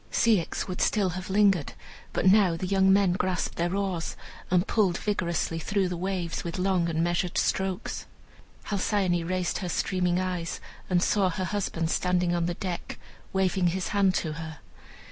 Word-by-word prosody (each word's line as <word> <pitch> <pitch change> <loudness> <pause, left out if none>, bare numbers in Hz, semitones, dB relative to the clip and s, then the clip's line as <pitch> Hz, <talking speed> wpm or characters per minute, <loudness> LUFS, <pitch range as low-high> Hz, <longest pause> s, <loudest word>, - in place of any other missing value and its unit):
Ceyx 215 -8 +1
would 180 -1 -4
still 200 -4 +2
have 180 +1 -6
lingered, 195 -5 +3 0.4
but - - -1
now 190 -3 +5
the 185 - -3
young 190 0 +3
men 195 -2 +4
grasped 185 -1 -1
their 175 +2 0
oars 190 -4 -2 0.3
and 180 +1 +3
pulled 195 -6 +2
vigorously 170 -5 -1
through 195 +3 0
the 180 - -3
waves, 180 -1 -3
with 170 0 -4
long 185 -2 +1
and 165 0 0
measured 175 +1 0
strokes. 190 -1 -1 0.6
Halcyone 190 -4 0
raised 185 0 -1
her 180 - -4
streaming 180 0 0
eyes, 180 -3 -3 0.3
and 180 -1 +3
saw 195 -3 +2
her 185 +2 -3
husband 180 -5 -2
standing 180 -1 +1
on 170 -1 0
the 175 - -2
deck, 180 -2 -5 0.3
waving 190 -1 +1
his 185 +2 -1
hand 195 -2 +2
to 155 -2 -1
her. 160 0 -7
185 Hz, 165 wpm, -27 LUFS, 175-190 Hz, 0.6 s, now